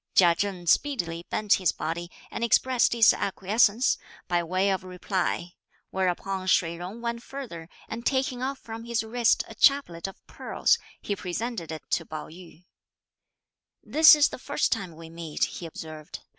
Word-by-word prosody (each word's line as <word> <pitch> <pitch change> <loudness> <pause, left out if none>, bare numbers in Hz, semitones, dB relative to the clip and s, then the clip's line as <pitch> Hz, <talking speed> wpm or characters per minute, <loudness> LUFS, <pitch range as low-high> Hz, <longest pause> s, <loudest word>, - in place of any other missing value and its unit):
Chia 175 -2 +7
Chen 185 -1 -3
speedily 170 - +1
bent 210 -2 +2
his 185 - +3
body 170 +2 -4 0.2
and - - -4
expressed 245 +2 +3
his 230 -2 +6
acquiescence, 210 +5 +2 0.3
by 175 -1 +1
way 185 +4 +1
of 190 -1 -1
reply; 180 -1 -2 0.4
whereupon 190 0 -1
Shih 170 -3 +2
Jung 185 +7 -7
went 235 0 -3
further, 220 -13 -8 0.2
and 230 +1 -6
taking 260 -1 0
off 270 +2 -2
from 225 -1 -8
his 235 -1 -1
wrist 230 +1 +2
a - - -10
chaplet 235 - +3
of 195 - -12
pearls, - - +1 0.2
he 205 - -3
presented 185 -1 -4
it 160 - -6
to 165 - +1
Pao 155 -1 -7
yü. 175 +1 -14 1.2
"This 315 0 +8
is 295 -1 +4
the - - -8
first 285 +3 -1
time 190 -8 -2
we 165 0 -11
meet," 165 -2 -4
he 170 - -7
observed. 155 -1 -9
190 Hz, 160 wpm, -27 LUFS, 170-235 Hz, 1.2 s, This